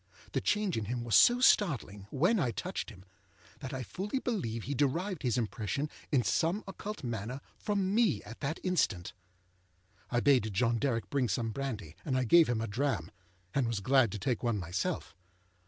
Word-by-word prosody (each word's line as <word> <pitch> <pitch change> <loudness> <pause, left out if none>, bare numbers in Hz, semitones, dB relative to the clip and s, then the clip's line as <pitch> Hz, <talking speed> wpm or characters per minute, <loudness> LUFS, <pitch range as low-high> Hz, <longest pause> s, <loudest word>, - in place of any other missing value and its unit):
The - - 0
change 205 - +1
in 110 - -2
him 120 +2 -3
was 115 -2 -3
so 240 - +7
startling, 125 - +3
when 175 - +2
I 135 -8 +1
touched 110 - -4
him, 95 - -13 0.5
that 135 -2 -6
I 130 -2 -4
fully 200 - -3
believe 120 - -2
he 145 - -3
derived 160 +6 0
his 125 -2 0
impression 120 +6 -2 0.2
in 130 -4 +3
some 175 - +1
occult 205 0 -6
manner 120 +2 -4 0.2
from 200 -2 -1
me 210 - +2
at 115 +3 -10
that 155 +3 -3
instant. 115 - 0 1.0
I 120 - +1
bade 125 -5 +3
John 115 +3 +2
Derrick 120 -4 -1
bring 135 -4 +1
some 115 +3 -1
brandy, 110 - -5
and 130 -2 0
I 130 - +2
gave 165 +6 +6
him 115 -2 0
a 115 - -2
dram, 110 - -1 0.4
and 135 -3 +1
was 115 -3 -1
glad 130 +1 +3
to - - -3
take 115 +4 -1
one 120 -3 0
myself. 90 -1 -3
125 Hz, 185 wpm, -31 LUFS, 110-160 Hz, 1.0 s, so